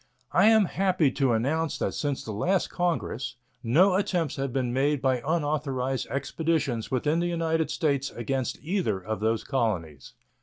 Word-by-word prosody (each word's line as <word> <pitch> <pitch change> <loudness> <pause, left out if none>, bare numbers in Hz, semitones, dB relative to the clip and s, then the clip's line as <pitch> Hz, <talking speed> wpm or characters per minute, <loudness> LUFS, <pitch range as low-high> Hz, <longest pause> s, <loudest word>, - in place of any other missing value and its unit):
I - - +4
am 220 -2 +6
happy 180 -6 +1
to 135 -2 +1
announce 145 +7 0
that - - -1
since 145 -2 -2
the 110 - -6
last 180 - 0
Congress 150 -9 -2 0.3
no 170 +12 +4
attempts 180 -5 0
have 135 -1 -2
been 125 -1 -1
made 140 +2 +2
by 130 -2 +1
unauthorized 145 -4 -1
expeditions 140 -4 -1
within 145 +5 +1
the 175 - 0
United 160 -2 0
States 140 -4 0
against 130 +2 -3
either 165 - 0
of 105 +2 -4
those 110 +1 0
colonies. 90 - -2
140 Hz, 155 wpm, -27 LUFS, 125-165 Hz, 0.3 s, am